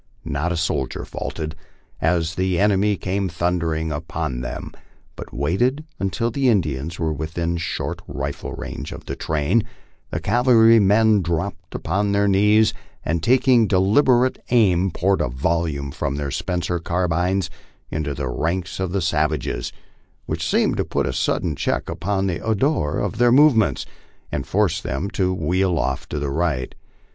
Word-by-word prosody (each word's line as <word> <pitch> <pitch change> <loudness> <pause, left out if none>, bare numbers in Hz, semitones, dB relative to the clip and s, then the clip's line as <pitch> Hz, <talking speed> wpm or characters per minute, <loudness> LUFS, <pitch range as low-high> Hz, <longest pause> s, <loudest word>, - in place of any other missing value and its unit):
Not 75 +5 -1
a 85 - -1
soldier 80 -5 -2
faltered 80 +1 -5 0.5
as 80 -1 +1
the 95 +1 0
enemy 105 0 +3
came 95 +1 -1
thundering 85 -2 -1
upon 80 -4 -3
them, - - -5 0.4
but - - -9
waiting 120 - 0
until 115 +5 -1
the 135 +2 +2
Indians 80 - 0
were 80 -2 -1
within 80 +3 -2
short 85 - -3
rifle 70 0 -4
range - - -6
of - - -10
the - - -4
train, 80 +9 +1 0.5
the - - -3
cavalrymen 110 -3 +5
dropped 85 +3 -3
upon 100 +4 0
their 100 0 +3
knees, 105 +2 +4 0.3
and 85 -1 0
taking 125 - +4
deliberate 120 +7 +3
aim 95 -6 +3
poured 95 +1 +1
a 75 - +1
vol 80 +8 0
ley 70 -3 -4
from 70 +1 -2
their 70 -1 -3
Spencer 90 +1 -2
carbines 90 +2 0 0.4
into 75 -2 -2
the 70 -2 -3
ranks 85 +7 -2
of 95 -2 -2
the 100 -3 0
savages, 75 -3 -1 0.5
which - - -2
seemed - - +2
to - - +1
put - - -1
a - - -2
sudden - - 0
check - - -1
upon 95 +4 -1
the 85 -4 -2
ardor 110 - +1
of 100 +2 -2
their 120 0 +5
movements 130 -5 +4 0.5
and 70 -2 -3
forced - - +1
them 85 +10 -3
to 95 -1 +1
wheel 90 +1 +1
off 65 -3 -2
to 75 - -3
the 70 -1 -2
right. 75 -5 -1
90 Hz, 155 wpm, -22 LUFS, 80-100 Hz, 0.5 s, cavalrymen